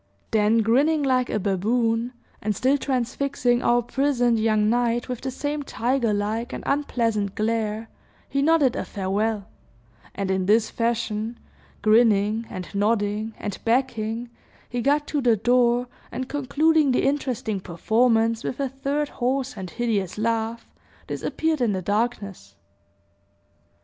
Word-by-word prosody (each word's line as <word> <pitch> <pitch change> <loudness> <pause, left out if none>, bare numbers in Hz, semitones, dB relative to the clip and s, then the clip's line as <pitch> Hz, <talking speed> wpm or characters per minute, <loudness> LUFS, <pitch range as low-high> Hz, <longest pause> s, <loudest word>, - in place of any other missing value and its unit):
Then, 220 +1 +3
grinning 285 +7 +3
like 255 -2 +2
a - - 0
baboon, 225 +5 0 0.3
and 210 0 -1
still 260 +7 +2
transfixing 255 -2 0
our 240 0 +3
puissant 245 -3 +1
young 215 -1 +2
knight 240 +1 +1
with 250 -2 -4
the 265 - -3
same 290 +3 -3
tiger 245 -3 0
like 215 +4 -2
and - - -5
unpleasant 230 -8 0
glare, 220 0 -1 0.4
he 275 - -1
nodded 295 -4 +3
a - - -2
farewell; 205 +1 -2 0.7
and 195 -1 -2
in 190 -1 0
this 220 +1 +3
fashion, 230 -1 -1 0.5
grinning, 215 0 +3
and 185 0 -7
nodding, 210 +1 0
and 205 -2 -5
backing, 235 -1 -1 0.4
he 245 0 -3
got 290 +3 +2
to 290 - -1
the 235 -3 +3
door, 245 +2 +3 0.3
and 260 0 -4
concluding 290 +2 +2
the - - +1
interesting 260 -6 -1
performance 225 +6 +1
with 255 - -4
a 275 -1 0
third 275 +3 -2
hoarse 260 +1 -1
and 190 -3 -6
hideous 205 -2 -2
laugh, 230 +1 -1 0.4
disappeared 320 -3 -2
in 230 -4 +2
the 190 - -2
darkness. 200 - -2
230 Hz, 135 wpm, -24 LUFS, 215-255 Hz, 0.7 s, Then